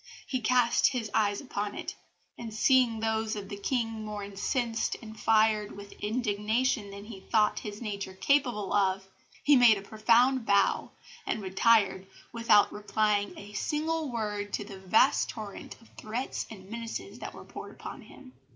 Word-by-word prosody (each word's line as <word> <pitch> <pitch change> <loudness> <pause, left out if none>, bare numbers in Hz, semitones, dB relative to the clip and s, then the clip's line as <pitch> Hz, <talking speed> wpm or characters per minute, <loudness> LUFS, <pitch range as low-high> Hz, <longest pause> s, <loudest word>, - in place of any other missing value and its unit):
He 260 - -2
cast 240 +1 +4
his 225 -5 -3
eyes 205 -2 +1
upon 205 -6 -4
it, - - -5 0.4
and 230 -2 -7
seeing 230 0 +3
those 220 0 0
of 200 -2 -7
the - - -5
King 225 +1 -2
more 210 -1 -5
incensed 225 +4 -1
and 220 -2 -11
fired 215 -1 +3
with 200 0 -10
indignation 215 +1 0
than 200 +1 -9
he 210 -3 -9
thought 210 +2 +1
his 210 +2 -7
nature 200 -3 -5
capable 240 -3 +1
of, 190 -1 +1 0.4
he 290 - +6
made 240 -4 +7
a 195 - -8
profound 235 +5 +3
bow, 200 -2 +2 0.4
and 215 - -2
retired 195 0 +3 0.3
without 230 -3 +4
replying 210 0 0
a 205 +1 -10
single 305 +5 -1
word 210 -3 -3
to - - -1
the 195 -1 -10
vast 215 +8 +3
torrent 215 -3 -8
of 230 - -20
threats 230 +5 -4
and 195 -2 -12
menaces 230 0 -6
that - - -7
were - - -11
poured - - -10
on - - -7
him." 260 -2 -15
215 Hz, 160 wpm, -29 LUFS, 205-235 Hz, 0.4 s, made